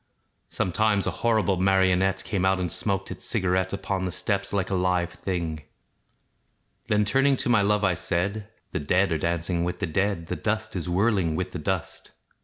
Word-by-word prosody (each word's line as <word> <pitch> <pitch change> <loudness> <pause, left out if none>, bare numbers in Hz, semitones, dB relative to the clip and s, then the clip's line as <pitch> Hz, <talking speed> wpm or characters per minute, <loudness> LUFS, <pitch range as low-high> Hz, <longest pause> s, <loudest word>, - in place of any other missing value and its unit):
Sometimes 100 +2 +1
a 95 - 0
horrible 105 0 +1
marionette 95 0 +2
Came 100 -4 -2
out, 95 0 +3
and 90 -2 -2
smaoked 95 -2 -1
its - - -7
cigarette 95 -3 0
Upon 100 -1 -2
the 90 - -2
steps 100 +1 -2
like 100 -1 -1
a - - +1
live 90 -1 +1
thing. 85 -5 -3 1.3
Then, 105 0 +2
turning 135 +5 +3
to - - -2
my 115 -4 +5
love, 105 +1 +2
I 95 -2 +3
said, 100 +5 -2 0.2
"The - - -2
dead 90 +6 +2
are 80 - 0
dancing 85 +1 -1
with 90 +1 -2
the 95 - -2
dead, 95 +1 -1
The - - -3
dust 110 0 -2
is 90 -1 -3
whirling 95 -3 +2
with 90 +2 -3
the 90 - -5
dust." 95 0 -4
95 Hz, 185 wpm, -26 LUFS, 90-100 Hz, 1.3 s, my